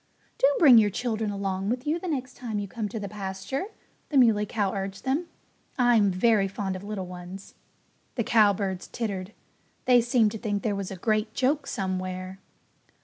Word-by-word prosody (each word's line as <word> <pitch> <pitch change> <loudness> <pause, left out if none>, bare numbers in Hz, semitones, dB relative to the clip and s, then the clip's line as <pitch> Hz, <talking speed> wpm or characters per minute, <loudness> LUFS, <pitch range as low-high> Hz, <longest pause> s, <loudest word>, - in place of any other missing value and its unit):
"Do 270 - +6
bring 265 -8 +8
your 210 -2 +3
children 220 0 -2
along 195 -1 -2
with 250 +2 -2
you 310 +3 0
the 370 - -6
next 260 -5 -3
time 225 -4 -4
you 205 -1 -3
come 210 +2 -4
to 220 - -5
the 200 - -4
pasture," 195 - -4 0.4
the 290 - +1
Muley 220 -5 +4
Cow 205 -4 -1
urged 195 0 -4
them. 290 +6 0 0.5
"I'm 240 -5 +4
very 195 +2 +3
fond 195 -1 -3
of 185 - -7
little 200 -2 -4
ones." 180 +2 -9 0.6
The 235 - 0
cowbirds 200 -5 +2
tittered. 200 -4 -4 0.5
They 245 -1 +6
seemed 235 -2 +3
to 220 - -6
think 205 -3 -2
there 215 - 0
was 195 -2 -4
a 195 - -6
great 215 +3 -1
joke 275 +2 +1
somewhere. 185 0 -4
210 Hz, 180 wpm, -27 LUFS, 195-240 Hz, 0.6 s, bring